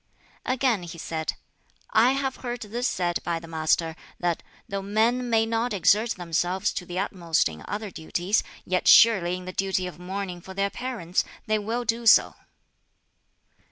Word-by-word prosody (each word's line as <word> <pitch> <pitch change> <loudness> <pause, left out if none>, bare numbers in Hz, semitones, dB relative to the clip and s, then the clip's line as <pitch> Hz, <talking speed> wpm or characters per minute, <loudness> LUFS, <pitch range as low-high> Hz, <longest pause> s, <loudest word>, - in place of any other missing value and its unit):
Again 255 -5 +1
he 175 0 -8
said, 160 -1 -3 0.6
"I 240 +4 +5
have 270 -1 -2
heard 245 -1 -5
this 235 +4 -2
said 175 -2 -1
by 170 -1 -1
the 165 0 -9
Master, 160 0 0 0.2
that 175 -2 0 0.3
'though 195 0 -3
men 225 +5 +1
may 225 -1 +3
not 230 +1 -1
exert 210 +4 +3
themselves 175 +1 -1
to 180 - -5
the 175 - -5
utmost 180 -4 +1
in 80 -1 -8
other 210 -1 -4
duties, 175 +6 0 0.2
yet 180 0 0
surely 190 -6 +7
in 185 - -9
the 185 - -6
duty 190 -1 0
of 180 -1 -8
mourning 180 -1 -5
for 190 +2 -10
their 200 0 0
parents 230 -9 -2 0.2
they 215 0 +1
will 230 +4 -2
do 230 +1 -1
so!'" - - +7
195 Hz, 165 wpm, -26 LUFS, 175-225 Hz, 0.6 s, surely